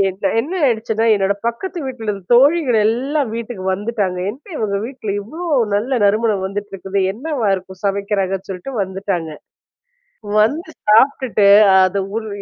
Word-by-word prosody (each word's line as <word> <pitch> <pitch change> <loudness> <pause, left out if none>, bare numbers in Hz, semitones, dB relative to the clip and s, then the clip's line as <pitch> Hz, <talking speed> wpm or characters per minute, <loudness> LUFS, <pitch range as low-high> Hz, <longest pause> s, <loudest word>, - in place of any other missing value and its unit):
என் 190 0 -4 0.2
எ்னன 315 +11 -2
ஆயிடுச்சுன்னா, 225 -2 0
என்னோட 200 0 +1
பக்கத்து 350 +10 -3
வீட்டில 225 -5 -4 0.2
தோழிகள் 270 -1 +4
எல்லாம் 265 +4 0
வீட்டுக்கு 230 -4 -6
வந்துட்டாங்க. 200 -3 -2
"என்ன? 265 +7 -13
இவுங்க 200 -2 -1
வீட்ல 240 -6 -6
இவ்ளோ 310 - -8 0.3
நல்ல 245 +5 0
நறுமணம் 210 -1 +1
வந்துட்டு 205 +1 -6
இருக்குது. 195 +1 -2
என்னவா 260 -1 -3
இருக்கும். 185 0 -8
சமைக்கிறாங்க." 195 -1 0
சொல்லிட்டு 190 +8 -6
வந்துட்டாங்க. 190 -3 -3 1.1
வந்து 310 +10 0 0.2
சாப்டுட்டு 225 -3 +4 0.4
அது 195 +2 0 0.2
ஒரு 220 -1 -7
220 Hz, 130 wpm, -18 LUFS, 195-255 Hz, 1.1 s, தோழிகள்